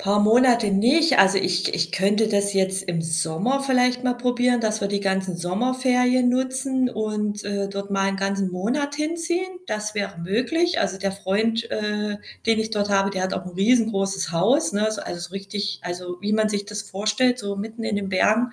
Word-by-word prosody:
Paar 200 +1 +2
Monate 235 0 +4
nicht. 260 +9 +4
Also, 195 0 +6
ich 185 0 0
ich 170 +1 0
könnte 205 +4 +2
das 200 -1 +1
jetzt 190 0 +1
im 170 -3 -2
Sommer 165 +12 -1
vielleicht 250 -1 +2
mal 250 -1 +1
probieren, 245 0 +1
dass 220 -1 -1
wir 200 - 0
die 200 0 -1
ganzen 190 -2 -1
Sommerferien 250 +7 +1
nutzen 260 +1 0
und, 210 -2 -3
äh, 200 -1 -2
dort 200 0 -6
mal 195 -1 +1
'n - - -3
ganzen 195 0 -1
Monat 265 +11 -2
hinziehen. 340 +4 -2
Das 215 0 -4
wäre 200 -4 -3
möglich. 250 - 0
Also, 190 - -1
der 195 0 -1
Freund, 220 +4 -1
äh, 210 -1 -2 0.3
den 225 -1 +3
ich 220 - -3
dort 205 -1 -1
habe, 195 0 +2
der 185 -1 -2
hat 190 - -2
auch 180 - -4
'n 180 -1 -9
riesengroßes 195 -4 +1
Haus, 200 - +2
ne, 210 +1 +1
ist 215 -2 -2
also, 175 0 -6
richtig 200 +1 -4
also, 180 0 -5
wie 205 +1 -2
man 215 0 +2
sich 205 -1 -2
das 210 0 -5
vorstellt, 215 +5 0
so 200 -1 -4
mitten 225 +3 -6
in 220 -2 -1
den 200 -1 -3
Bergen, 220 +5 +2
210 Hz, 195 wpm, -23 LUFS, 195-245 Hz, 0.3 s, Also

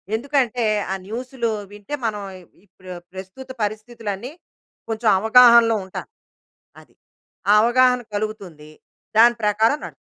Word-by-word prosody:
ఎందుకంటే 250 -2 -1 0.3
ఆ - - -1
న్యూస్‌లు 240 +1 -4 0.2
వింటే 205 +8 -7
మనం 210 -2 -2 0.4
ఇప్పుడు 185 0 -14 0.2
ప్రస్తుత 190 +8 -10
పరిస్థితులు 215 +1 -5
అన్ని 245 +8 -9 0.6
కొంచెం 225 0 -2
అవగాహనలో 235 0 +6
ఉంటా. 190 - -7 0.8
అది. - - -24 0.6
ఆ - - +7
అవగాహన 250 +1 +3
కలుగుతుంది. 195 -8 -6 0.5
దాని 240 +1 +6
ప్రకారం 220 +7 +2
నడు - - -9
225 Hz, 115 wpm, -21 LUFS, 205-245 Hz, 0.8 s, ఆ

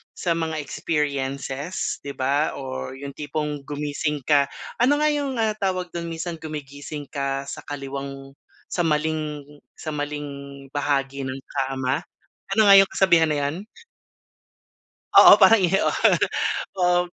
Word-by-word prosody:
sa 175 - -1
mga 160 -2 -2
experiences 140 +1 -2
'di 140 - -4
ba 140 +3 0
or 130 -1 -5
yung 140 +1 -7
tipong 150 -1 -4
gumising 150 +1 -3
ka. 140 +1 +4 0.3
Ano 285 +5 +3
nga 305 - +4
yung, 280 -5 -1
ah, 215 -1 0
tawag 185 -3 -1
do'n? 170 0 -5
Minsan 165 0 -4
gumigising 145 -2 -7
ka 140 -1 -3
sa - - -7
kaliwang 135 -1 -7 0.3
sa 175 - 0
maling 155 -1 -1 0.3
sa 155 - -7
maling 140 -2 -6
bahagi 140 -1 -1
ng 130 +1 -5 0.2
kama? 135 +4 -2 0.5
Ano 215 0 +5
nga 195 - +10
yung 195 0 +6
kasabihan 170 -4 +5
na 155 -1 0
iyon? 155 +8 -3 1.5
Oo - - +11
parang 225 -1 +6
'yon. 190 +1 +2 0.9
Um, 180 0 +3
150 Hz, 135 wpm, -23 LUFS, 140-170 Hz, 1.5 s, Oo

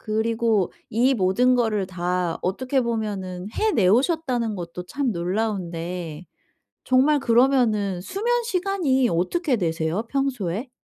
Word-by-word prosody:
그리고 220 -2 0 0.2
이 245 +5 +3
모든 225 +5 +3
거를 215 -5 0
다 180 -1 -2
어떻게 260 +8 0
보면은 205 -6 -3
해내 310 - +2
오셨다는 250 - +1
것도 175 0 -6
참 265 +4 -1
놀라운데 175 -3 -3 0.6
정말 275 +4 +4
그러면은 230 -7 +2
수면시간이 390 - 0
어떻게 255 - 0
되세요, 165 +2 -1
평소에? 255 -5 -2
220 Hz, 265 characters per minute, -23 LUFS, 180-260 Hz, 0.6 s, 정말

